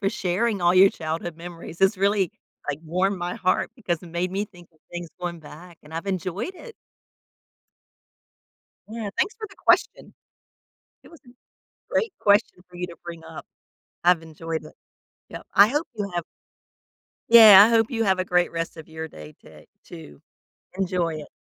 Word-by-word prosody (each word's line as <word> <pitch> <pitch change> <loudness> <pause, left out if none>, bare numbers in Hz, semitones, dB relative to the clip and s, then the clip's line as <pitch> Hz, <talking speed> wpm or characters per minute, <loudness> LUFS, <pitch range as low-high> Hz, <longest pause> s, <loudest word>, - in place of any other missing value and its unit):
for 195 - +1
sharing 195 +3 -1
all 175 +1 +3
your 190 +1 +8
childhood 160 +1 -5
memories. 170 -1 -10
This 195 +1 +3
really, 200 -2 +1 0.4
like, 145 - -2
warmed 185 +4 0
my 175 0 -3
heart 185 - 0
because 175 -8 -3
it - - -11
made 175 +2 -2
me 200 +2 -1
think 175 -4 -17
of 160 - -31
things 175 -1 -6
going 175 -1 -4
back 165 +3 -13
and 150 +1 -15
I've 165 +4 -5
enjoyed 190 - -3
it. 460 +4 -12 2.1
Yeah. 220 -2 -5
Thanks 415 +4 +1
for 440 -1 -7
the 390 - -18
question. - - +1 0.9
It - - -17
was 330 - -16
a - - -15 0.6
great 450 -4 0
question 205 -2 +3
for 180 - -16
you 180 0 -4
to 170 - -11
bring 170 -1 -9
up. 160 0 -10 0.6
I've 175 -2 +4
enjoyed 160 0 -6
it. 155 - -13 0.5
Yep. - - -10
I 200 +2 +7
hope 295 +6 -1
you 205 -3 -4
have 175 -1 -1 1.1
Yeah. 215 -4 +10
I - - +1
hope 225 0 +2
you 225 -2 -1
have 190 -1 +2
a 185 - 0
great 180 -1 +1
rest 165 0 -4
of 160 - -11
your 160 0 -7
day 75 - -12
to - - -16 0.2
too. 75 -3 -12 0.6
Enjoy 180 -4 -1
it. 150 -1 -9
180 Hz, 175 wpm, -24 LUFS, 165-205 Hz, 2.1 s, Yeah